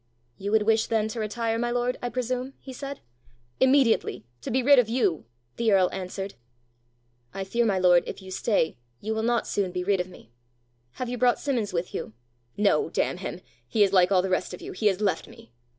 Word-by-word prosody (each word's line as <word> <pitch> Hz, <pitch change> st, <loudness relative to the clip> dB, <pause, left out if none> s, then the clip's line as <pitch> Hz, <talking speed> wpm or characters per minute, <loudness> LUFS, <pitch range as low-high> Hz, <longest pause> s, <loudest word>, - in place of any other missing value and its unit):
"You 200 Hz, -, -3 dB
would 220 Hz, -1 st, +4 dB
wish 220 Hz, +1 st, +2 dB
then 220 Hz, -1 st, +1 dB
to 225 Hz, -, -5 dB
retire, 225 Hz, +1 st, -1 dB
my 240 Hz, 0 st, 0 dB
lord, 245 Hz, +1 st, -1 dB
I 245 Hz, -, -2 dB
presume?" 255 Hz, +2 st, -3 dB
he 265 Hz, -, -10 dB
said. 275 Hz, +2 st, -7 dB, 0.6 s
"Immediately 260 Hz, -, +3 dB, 0.2 s
to -, -, -5 dB
be 255 Hz, +2 st, +1 dB
rid 280 Hz, +1 st, +7 dB
of 230 Hz, -3 st, +2 dB
you!" 225 Hz, -9 st, +1 dB, 0.3 s
the 230 Hz, -2 st, +2 dB
earl 190 Hz, -2 st, +4 dB
answered. 190 Hz, +1 st, -5 dB, 1.0 s
"I 195 Hz, -, -2 dB
fear, 235 Hz, +5 st, +1 dB
my 195 Hz, -3 st, +2 dB
lord, 180 Hz, -2 st, +5 dB
if -, -, -6 dB
you 190 Hz, -1 st, -11 dB
stay, 185 Hz, -, 0 dB, 0.2 s
you 220 Hz, +1 st, -3 dB
will 220 Hz, -, -1 dB
not 235 Hz, +1 st, +1 dB
soon 195 Hz, -3 st, -1 dB
be 180 Hz, 0 st, -3 dB
rid 195 Hz, 0 st, +2 dB
of 180 Hz, +1 st, -2 dB
me! 145 Hz, -10 st, -16 dB, 0.6 s
Have 255 Hz, -, -4 dB
you 245 Hz, 0 st, -4 dB
brought 250 Hz, -1 st, +4 dB
Simmons 245 Hz, -8 st, -1 dB
with 170 Hz, 0 st, -3 dB
you?" -, -, -5 dB, 0.4 s
"No, 210 Hz, -, +2 dB
damn -, -, 0 dB
him! -, -, -6 dB, 0.3 s
he 215 Hz, -3 st, +3 dB
is 195 Hz, -1 st, +1 dB
like 185 Hz, 0 st, +5 dB
all 185 Hz, -2 st, +4 dB
the 190 Hz, -, -1 dB
rest 185 Hz, 0 st, 0 dB
of -, -, -16 dB
you: -, -, -6 dB
he 210 Hz, +3 st, 0 dB
has 195 Hz, 0 st, +1 dB
left 200 Hz, -3 st, 0 dB
me!" 115 Hz, -, -15 dB
220 Hz, 215 wpm, -26 LUFS, 190-245 Hz, 1.0 s, rid